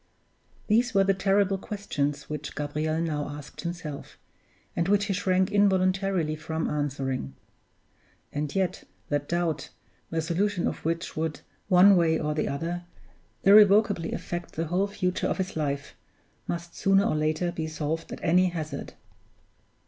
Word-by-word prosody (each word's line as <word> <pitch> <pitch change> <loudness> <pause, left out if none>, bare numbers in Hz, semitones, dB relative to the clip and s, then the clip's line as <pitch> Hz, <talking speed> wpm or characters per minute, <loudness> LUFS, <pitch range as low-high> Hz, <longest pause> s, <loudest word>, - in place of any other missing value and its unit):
These 230 +1 +2
were 195 - +6
the 195 0 +3
terrible 195 0 +2
questions 150 -10 -3
which 150 -1 -5
Gabriel 150 +2 -1
now 150 -3 -2
asked 145 0 -8
himself, 170 -4 -6 0.6
and 170 - 0
which 205 +1 +3
he 205 - -1
shrank 185 -1 +1
involuntarily 190 -4 +2
from 160 +1 -3
answering. 135 - -2 1.0
And 145 0 -3
yet 190 -3 0 0.3
that 145 0 -1
doubt, 170 -3 -1 0.4
the 165 - -1
solution 180 +3 0
of - - -4
which 165 +2 -2
would, 160 -1 -2 0.3
one 190 +1 +7
way 165 -2 +3
or 150 -1 -1
the 150 - -1
other, 170 +5 -3 0.6
irrevocably 205 -3 +6
affect 175 0 -5
the 165 - -2
whole 180 +5 +1
future 185 -3 -1
of - - -1
his 190 0 -3
life, 140 -2 -2 0.5
must 170 0 -4
sooner 195 0 +3
or 205 - +1
later 155 +3 0
be 160 -2 -3
solved 155 +1 -3
at - - -7
any 180 +2 +4
hazard! 160 -3 -5
170 Hz, 145 wpm, -27 LUFS, 155-195 Hz, 1.0 s, one